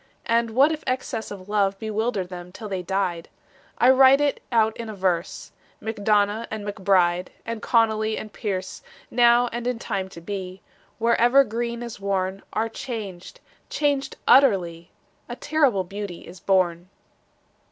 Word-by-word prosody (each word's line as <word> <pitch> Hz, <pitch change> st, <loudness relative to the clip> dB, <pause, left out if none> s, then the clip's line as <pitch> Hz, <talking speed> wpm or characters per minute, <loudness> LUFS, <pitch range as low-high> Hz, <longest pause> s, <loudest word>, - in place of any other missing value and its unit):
And 230 Hz, 0 st, +2 dB
what 280 Hz, +5 st, +5 dB
if 310 Hz, -1 st, -4 dB
excess 255 Hz, -3 st, -2 dB
of 195 Hz, -2 st, -9 dB
love 200 Hz, -2 st, +1 dB
Bewildered 215 Hz, -2 st, -2 dB
them 180 Hz, -1 st, -9 dB
till 215 Hz, +3 st, -8 dB
they 190 Hz, -2 st, -3 dB
died? 180 Hz, -2 st, -2 dB, 0.5 s
I 250 Hz, +2 st, +6 dB
write 265 Hz, +1 st, +6 dB
it 290 Hz, -1 st, 0 dB
out 220 Hz, -2 st, +3 dB
in 230 Hz, -1 st, -6 dB
a 215 Hz, -, -6 dB
verse 185 Hz, -3 st, -2 dB, 0.3 s
MacDonagh 215 Hz, 0 st, 0 dB
and 215 Hz, -1 st, -5 dB
MacBride 185 Hz, -3 st, +1 dB, 0.2 s
And 230 Hz, -1 st, -5 dB
Connolly 220 Hz, -1 st, +2 dB
and 215 Hz, -, -7 dB
Pearse 190 Hz, -4 st, -4 dB, 0.3 s
Now 240 Hz, 0 st, +5 dB
and 240 Hz, +1 st, -4 dB
in 250 Hz, -1 st, -1 dB
time 195 Hz, -4 st, -3 dB
to 170 Hz, -, -11 dB
be, 185 Hz, +1 st, -6 dB, 0.3 s
Wherever 240 Hz, +3 st, +4 dB
green 235 Hz, 0 st, -4 dB
is 235 Hz, -3 st, -8 dB
worn, 195 Hz, -1 st, -2 dB
Are 225 Hz, -, 0 dB
changed, 220 Hz, -6 st, -7 dB, 0.3 s
changed 285 Hz, -2 st, 0 dB
utterly: 185 Hz, -11 st, +4 dB, 0.4 s
A 240 Hz, -, -4 dB
terrible 270 Hz, -10 st, +1 dB
beauty 195 Hz, -1 st, -7 dB
is 175 Hz, +1 st, -11 dB
born. 180 Hz, -1 st, +1 dB
215 Hz, 150 wpm, -24 LUFS, 190-235 Hz, 0.5 s, I